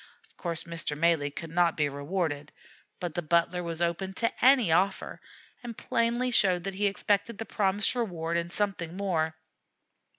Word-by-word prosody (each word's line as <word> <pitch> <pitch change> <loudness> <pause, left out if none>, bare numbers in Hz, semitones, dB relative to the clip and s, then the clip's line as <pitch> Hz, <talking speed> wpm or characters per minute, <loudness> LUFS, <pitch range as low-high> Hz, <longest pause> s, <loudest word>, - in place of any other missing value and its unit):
Of - - -30
course 170 -2 -3
Mr. 165 -3 -4
Malee 160 -2 +2
could 160 +3 -8
not 170 -1 +2
be 150 -2 +2
rewarded, 145 0 -3 0.5
but 175 -3 -4
the 175 - -1
butler 170 +2 +1
was 170 -1 -3
open 185 +3 -2
to 230 - +1
any 255 -8 +6
offer, 190 +4 +1 0.4
and 235 -2 -7
plainly 240 +2 +1
showed 185 -6 +3
that 195 +1 -3
he 205 +2 +1
expected 205 +2 0
the 225 - -5
promised 200 +1 +1
reward 175 -9 -2
and 170 0 -1
something 185 -4 -2
more. 165 -5 0
175 Hz, 165 wpm, -28 LUFS, 165-200 Hz, 0.5 s, any